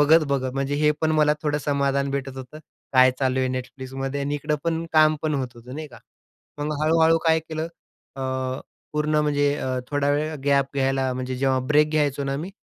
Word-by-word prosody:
बघत-बघत. 145 Hz, -4 st, +3 dB
म्हणजे 135 Hz, +1 st, -1 dB
हे 150 Hz, -, +5 dB
पण 160 Hz, -1 st, +2 dB
मला 150 Hz, -1 st, +4 dB
थोडं 150 Hz, -1 st, 0 dB
समाधान 140 Hz, -1 st, 0 dB
भेटत 135 Hz, -1 st, -4 dB
होतं 130 Hz, +4 st, -9 dB, 0.3 s
काय 130 Hz, -1 st, +7 dB
चालू 130 Hz, -1 st, +1 dB
आहे 130 Hz, -, +1 dB
Netflixमध्ये 135 Hz, +2 st, -5 dB
आणि 145 Hz, +1 st, -1 dB
इकडं 150 Hz, +3 st, -1 dB
काम 155 Hz, -1 st, +5 dB
पण 155 Hz, -1 st, 0 dB
होत 130 Hz, -2 st, -1 dB
होतं 120 Hz, +2 st, -11 dB
नाही 155 Hz, 0 st, -5 dB
का. 125 Hz, -, -14 dB, 0.6 s
मग 150 Hz, +1 st, -2 dB
हळू-हळू 160 Hz, +1 st, +4 dB
काय 160 Hz, 0 st, +5 dB
केलं, 160 Hz, 0 st, -4 dB, 0.5 s
अ, 135 Hz, -, -4 dB, 0.7 s
पूर्ण 150 Hz, 0 st, 0 dB
म्हणजे 145 Hz, -1 st, +2 dB
अ, 130 Hz, -2 st, -2 dB
थोडा 145 Hz, 0 st, +1 dB
वेळ 155 Hz, +2 st, 0 dB
गॅप 140 Hz, -1 st, +2 dB
घ्यायला, 135 Hz, -1 st, +1 dB
म्हणजे 130 Hz, 0 st, -3 dB
जेव्हा 130 Hz, 0 st, +1 dB
ब्रेक 150 Hz, +1 st, +5 dB
घ्यायचो 145 Hz, -2 st, +1 dB
ना 135 Hz, 0 st, -1 dB
मी, 170 Hz, +6 st, -5 dB
145 Hz, 185 wpm, -24 LUFS, 135-155 Hz, 0.7 s, काय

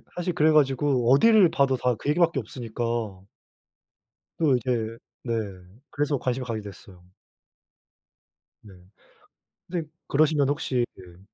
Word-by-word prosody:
사실 175 Hz, 0 st, -2 dB
그래 155 Hz, -1 st, +3 dB
가지고 135 Hz, -4 st, +2 dB
어디를 205 Hz, +5 st, +6 dB
봐도 135 Hz, -2 st, +2 dB
다 125 Hz, -1 st, 0 dB
그 140 Hz, -, -9 dB
얘기밖에 165 Hz, -2 st, +2 dB
없으니까 120 Hz, 0 st, -6 dB, 1.5 s
또 150 Hz, -5 st, +3 dB
이제 115 Hz, -2 st, -2 dB, 0.3 s
네, 120 Hz, -, -2 dB, 0.6 s
그래서 145 Hz, -1 st, -1 dB
관심이 125 Hz, 0 st, -2 dB
가게 115 Hz, -3 st, -4 dB
됐어요. 95 Hz, -3 st, -13 dB, 1.6 s
네. 100 Hz, -3 st, -14 dB, 1.0 s
근데 170 Hz, -3 st, -3 dB, 0.2 s
그러시면 145 Hz, -1 st, +2 dB
혹시 130 Hz, -4 st, 0 dB
그 90 Hz, -2 st, -15 dB
135 Hz, 250 characters per minute, -25 LUFS, 120-155 Hz, 1.6 s, 어디를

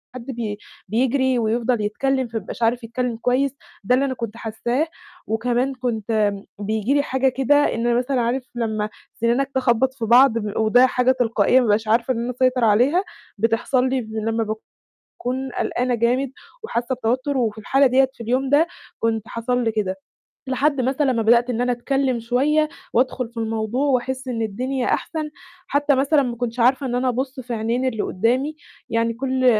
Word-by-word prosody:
حد 235 Hz, -, -7 dB
بي 230 Hz, -5 st, -4 dB, 0.3 s
بيجري 255 Hz, +3 st, +1 dB
ويفضل 230 Hz, +1 st, 0 dB
يتكلِّم 260 Hz, +5 st, 0 dB
فمايبقاش 225 Hz, +1 st, -5 dB
عارف 240 Hz, +2 st, +1 dB
يتكلّم 235 Hz, 0 st, -3 dB
كويس، 255 Hz, +3 st, +1 dB, 0.3 s
ده 250 Hz, +6 st, +3 dB
اللي 275 Hz, -, +2 dB
أنا 265 Hz, -, -1 dB
كنت 230 Hz, -2 st, -6 dB
حاساه، 240 Hz, +7 st, -1 dB, 0.4 s
وكمان 245 Hz, +4 st, 0 dB
كنت 220 Hz, -4 st, 0 dB, 0.3 s
بييجي 215 Hz, +5 st, 0 dB
لي 285 Hz, -, +4 dB
حاجة 265 Hz, 0 st, +1 dB
كده 265 Hz, +2 st, +2 dB
إن 240 Hz, -5 st, +2 dB
أنا 240 Hz, -, +3 dB
مثلًا 250 Hz, 0 st, 0 dB
عارف 245 Hz, +3 st, 0 dB
لمّا 220 Hz, -3 st, -1 dB, 0.2 s
سِنانك 245 Hz, +4 st, 0 dB
تخبَّط 260 Hz, 0 st, +2 dB
في 235 Hz, -4 st, -4 dB
بعض، 240 Hz, +1 st, +6 dB
ب 210 Hz, -2 st, -3 dB
وده 240 Hz, +4 st, +5 dB
حاجة 250 Hz, 0 st, +2 dB
تلقائية 235 Hz, -1 st, +3 dB
ما -, -, +2 dB
بابقاش 215 Hz, +1 st, +1 dB
عارفة 235 Hz, +3 st, +2 dB
إن 230 Hz, -, -3 dB
أنا 250 Hz, -, -2 dB
أسيطر 255 Hz, 0 st, +1 dB
عليها، 250 Hz, -, +3 dB, 0.3 s
بتحصل 235 Hz, +4 st, +1 dB
لي 260 Hz, -1 st, 0 dB
لمّا 220 Hz, +1 st, -2 dB, 0.6 s
باكون 260 Hz, +1 st, -5 dB
قلقانة 250 Hz, 0 st, -1 dB
جامد، 245 Hz, +3 st, +1 dB, 0.3 s
وحاسة 245 Hz, -, -2 dB
بتوتر 255 Hz, +4 st, -1 dB
وفي 220 Hz, -3 st, 0 dB
الحالة 270 Hz, +6 st, +3 dB
ديَّة 265 Hz, +1 st, +3 dB
في 230 Hz, -, -9 dB
اليوم 260 Hz, +4 st, 0 dB
ده، 300 Hz, +4 st, +4 dB, 0.3 s
كنت 225 Hz, 0 st, -1 dB
حصل 245 Hz, +1 st, -1 dB
لي 225 Hz, -, +1 dB
كده، 195 Hz, -3 st, -1 dB, 0.5 s
لحد 270 Hz, +1 st, +1 dB
مثلًا 265 Hz, +1 st, +1 dB
ما 230 Hz, -, 0 dB
بدأت 235 Hz, +2 st, +4 dB
إن 240 Hz, -1 st, -1 dB
أنا 245 Hz, 0 st, +1 dB
أتكلم 260 Hz, +1 st, 0 dB
شوية 280 Hz, +7 st, +1 dB, 0.2 s
وأدخل 250 Hz, -1 st, +1 dB
في 235 Hz, -, -18 dB
الموضوع، 225 Hz, +4 st, -1 dB
وأحس 260 Hz, 0 st, -1 dB
إن 230 Hz, -2 st, -2 dB
الدنيا 250 Hz, +5 st, -2 dB
أحسن 310 Hz, -2 st, -2 dB, 0.4 s
حتى 285 Hz, -1 st, +2 dB
مثلًا 280 Hz, +2 st, +3 dB
ما 240 Hz, -2 st, -3 dB
كُنتش 240 Hz, 0 st, -4 dB
عارفة 260 Hz, +3 st, +3 dB
إن 245 Hz, -1 st, -2 dB
أنا 255 Hz, +1 st, +1 dB
أبُصّ 260 Hz, +2 st, -3 dB
في 245 Hz, -1 st, -5 dB
عينين 230 Hz, +3 st, -1 dB
اللي 225 Hz, -5 st, -1 dB
قُدّامي، 255 Hz, +10 st, 0 dB, 0.3 s
يعني 230 Hz, 0 st, +1 dB
كُلّ 260 Hz, +1 st, -1 dB
245 Hz, 175 wpm, -22 LUFS, 230-260 Hz, 0.6 s, بعض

